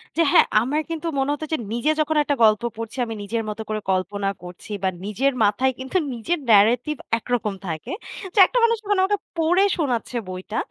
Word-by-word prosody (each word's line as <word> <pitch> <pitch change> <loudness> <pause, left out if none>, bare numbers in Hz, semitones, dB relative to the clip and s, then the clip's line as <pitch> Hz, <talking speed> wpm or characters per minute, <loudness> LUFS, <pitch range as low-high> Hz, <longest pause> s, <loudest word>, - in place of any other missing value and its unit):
হ্যাঁ, 330 -1 +3
হ্যাঁ। - - +6
আমার 290 +7 0
কিন্তু 330 0 -4
মনে 270 +1 0
হতো 305 +2 -4
যে - - +2 0.2
নিজে 255 +6 +1
যখন 310 +1 0
একটা 285 -1 0
গল্প 215 -1 +5 0.2
পড়ছি 230 +2 -6
আমি 225 - -5
নিজের 225 +2 -2
মতো 210 +1 -5
করে 215 0 -1
কল্পনা 195 +2 -1
করছি 180 +4 -11
বা 190 - +3 0.2
নিজের 260 +7 0
মাথায় 245 +6 +2
কিন্তু 260 +8 -2 0.2
নিজের 275 +9 -2
narrative 235 +8 +4 0.2
একরকম 230 -3 -2
থাকে। 160 -2 -5 0.4
তো - - -16
একটা - - -2
মানুষ 460 0 +4
মানে 410 -2 +3
আমাকে 410 +1 +1 0.2
পড়ে 350 +4 +3
শোনাচ্ছে 250 -6 -1
বইটা 185 +4 -4
245 Hz, 190 wpm, -23 LUFS, 210-310 Hz, 0.4 s, হ্যাঁ